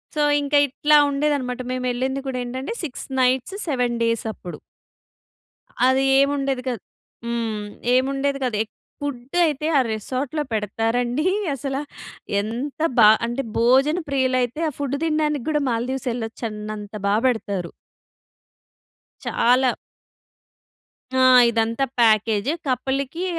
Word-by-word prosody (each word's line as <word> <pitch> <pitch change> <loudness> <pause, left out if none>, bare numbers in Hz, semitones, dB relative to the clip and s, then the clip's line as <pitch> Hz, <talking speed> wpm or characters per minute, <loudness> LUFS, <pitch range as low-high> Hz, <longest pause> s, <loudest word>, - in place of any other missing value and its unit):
So, 300 - +1 0.2
ఇంక 285 +1 -5
ఇట్లా 295 +3 +2
ఉండేది 290 +1 +1
అన్నమాట! 250 -1 -4
మేమెళ్ళింది 255 +2 -1
కూడా 255 -1 -2
ఏంటంటే 260 - -4
6 280 -6 -5 0.2
నైట్స్, 260 +9 +1
7 250 -5 0
డేస్ 230 0 0
అప్పుడు. 180 - -9 1.3
అది 265 +1 +3 0.2
ఏముండేది 275 -2 +1
కాదు. 235 -6 -4 0.4
హ్మ్. 225 -3 -2 0.3
ఏముండేది 275 +2 0
కాదు. 240 -4 -1
ఎప్ 225 - -21 0.3
ఫుడ్ 265 0 -5
అయితే 305 -1 -1
ఆ - - +6
రిసార్ట్‌లో 260 +7 -3
పెడతారండి 225 +5 0 0.3
అసలు 270 +1 -3 0.6
ఎంత 245 +8 -5 0.2
బా 220 -3 +8 0.2
అంటే 240 +4 -2 0.2
భోజన 265 +7 +4
ప్రియులైతే 260 0 0
ఆ - - -6
ఫుడ్ 280 -1 -1
తినడానికి 305 -4 0
కూడా 300 -1 +1
మాల్దీవ్స్ 250 +3 -2
వెళ్ళొచ్చన్నంత 215 -2 -5
బాగా 210 +3 +2
పెడతారు. 200 -7 -2 1.5
చాలా. 250 +1 +3 1.5
ఆ! - - +5 0.3
ఇదంతా 230 +3 0
ప్యాకేజ్. 220 +1 +3 0.2
కపుల్‌కి 270 +6 -1
255 Hz, 115 wpm, -22 LUFS, 230-275 Hz, 1.5 s, బా